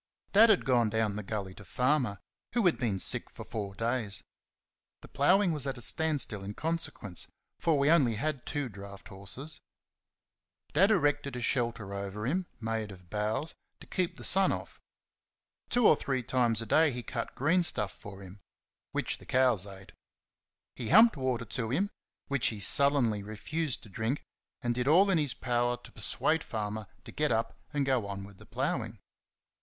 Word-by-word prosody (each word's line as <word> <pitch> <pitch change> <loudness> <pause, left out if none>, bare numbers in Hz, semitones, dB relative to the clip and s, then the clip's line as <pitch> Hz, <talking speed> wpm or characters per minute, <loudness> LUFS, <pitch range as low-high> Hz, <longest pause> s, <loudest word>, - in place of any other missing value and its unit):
Dad 220 +3 +8
had 205 - +4
gone 120 -4 +3
down 110 -1 0
the 105 - -3
gully 100 -2 -4
to 105 - -13
Farmer, 125 - +1 0.4
who 235 -4 +2
had 175 - +3
been 115 -6 0
sick - - +1
for - - -10
four 100 -3 -5
days. 115 -3 -1 0.8
The - - -12
ploughing 185 +6 +3
was 150 -3 -1
at 135 -1 -3
a - - -8
standstill 145 -11 0
in 100 +1 -6
consequence, 160 - -2 0.3
for 165 -3 +2
we 140 0 +2
had 165 +1 +6
only 130 +4 -1
two 145 -2 -3
draught 100 -2 -11
horses. 100 +10 -6 1.1
Dad 190 +7 +5
erected 145 - +1
a 125 - -4
shelter 115 -5 0
over 100 +2 -4
him, 175 +7 -1
made 110 -2 -3
of 90 -2 -15
boughs, 110 +9 -1 0.3
to - - -12
keep 180 -2 -2
the - - -9
sun 195 0 +5
off. - - -6 0.9
Two 245 -2 +3
or - - +7
three 130 -3 -2
times 120 -3 +2
a - - -8
day 155 +7 +4
he 125 -1 -5
cut - - -5
greenstuff 155 - +1
for 100 -1 -11
him 95 +2 -12 0.5
which - - -1
the - - -14
cows 125 -7 +3
ate. 95 -1 -12 0.8
He 120 - -4
humped 225 +4 +7
water 130 -4 -1
to 115 0 -3
him 195 - 0 0.4
which 140 -3 +2
he 110 - -1
sullenly 125 -3 +3
refused 130 +8 -3
to 110 - -11
drink; 110 +8 -2 0.4
and 120 0 +1
did 125 +1 -2
all 190 +7 +6
in 175 - +3
his 145 -4 0
power 120 -1 0
to 120 - -15
persuade 160 0 0
Farmer 105 -1 -4 0.2
to - - -9
get 150 -1 0
up 115 0 0 0.2
and 145 -2 0
go 130 -6 +1
on 100 -1 -5
with 100 -1 -13
the - - -14
ploughing. - - -2
120 Hz, 180 wpm, -30 LUFS, 105-150 Hz, 1.1 s, Dad